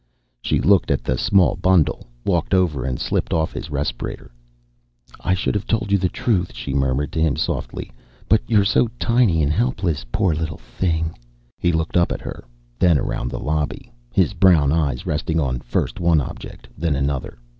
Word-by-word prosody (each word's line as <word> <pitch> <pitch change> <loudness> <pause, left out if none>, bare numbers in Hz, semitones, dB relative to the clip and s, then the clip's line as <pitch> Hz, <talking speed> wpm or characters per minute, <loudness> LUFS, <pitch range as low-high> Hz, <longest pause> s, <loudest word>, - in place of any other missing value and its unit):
She - - +1
looked 100 -3 +3
at - - 0
the 65 - 0
small 100 - +3
bundle, 90 -4 +2 0.2
walked 90 0 +1
over 80 -9 +1
and 65 -2 -2
slipped - - -1
off 80 -1 0
his - - -6
respirator. 70 -4 -4 0.9
"I 90 - +1
should 95 - -1
have 105 0 -3
told 110 -2 0
the 95 -2 +2
truth," 95 -6 0
she 70 - -5
murmured 70 +1 0
to 80 - -1
him 80 -3 +2
softly. - - -3 0.4
"But - - +4
you're 105 -2 +3
so 115 +4 +3
tiny 115 -10 +3
and 70 +1 +1
helpless. 95 - 0
Poor 90 +4 +2
little 80 -1 -3
thing!" 80 -3 -2 0.5
He 85 - +2
looked 80 +1 0
up 85 - +3
at - - -4
her, - - -7 0.4
then 85 -4 +5
around - - -2
the - - -5
lobby, 75 -1 -2 0.2
his 95 - +2
brown 85 -7 +4
eyes 70 -6 0
resting 80 +2 -1
on 65 -5 -1
first - - -2
one 85 -2 +3
object, 70 - -7
then 80 -2 0
another. 70 -1 -2
80 Hz, 175 wpm, -21 LUFS, 70-95 Hz, 0.9 s, then